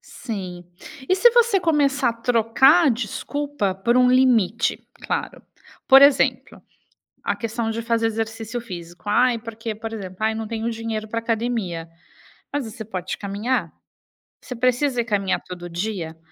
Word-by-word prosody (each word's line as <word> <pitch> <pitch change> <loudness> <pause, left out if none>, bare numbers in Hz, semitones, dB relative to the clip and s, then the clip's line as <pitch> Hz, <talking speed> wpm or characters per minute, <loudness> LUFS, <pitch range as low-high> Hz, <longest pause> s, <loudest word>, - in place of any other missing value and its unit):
Sim. 185 -7 -7 0.4
E 370 - +4
se 480 +5 +6
você 470 -4 +4
começar 285 -6 +2
a - - -4
trocar 245 +7 +4
a - - +5
desculpa 250 0 -2
por 235 +6 +1
um 250 0 +5
limite, 240 -4 +2
claro, - - -4 0.4
por 270 0 +8
exemplo, 280 -1 +3 0.6
a - - 0
questão 230 0 -3
de 230 +1 -3
fazer 230 0 +1
exercício 225 +1 -4
físico: 175 -5 -10
"Ai, 240 +2 +3
porque", 225 -1 -6
por 225 +1 -6
exemplo, 185 -4 -7
"Ai, 220 0 +2
eu - - -5
não 225 - -4
tenho 225 +1 -3
dinheiro 225 -1 -4
pra 230 +2 -2
academia.", 225 -8 -2 0.6
mas 285 -3 -1
você 220 0 -8
pode 190 -4 -5
caminhar. 205 +6 -2 0.7
Você 250 - -7
precisa 250 +1 +1
caminhar 200 -4 -1
todo 175 -1 -9
dia? 170 -3 -4
230 Hz, 150 wpm, -22 LUFS, 210-250 Hz, 0.7 s, por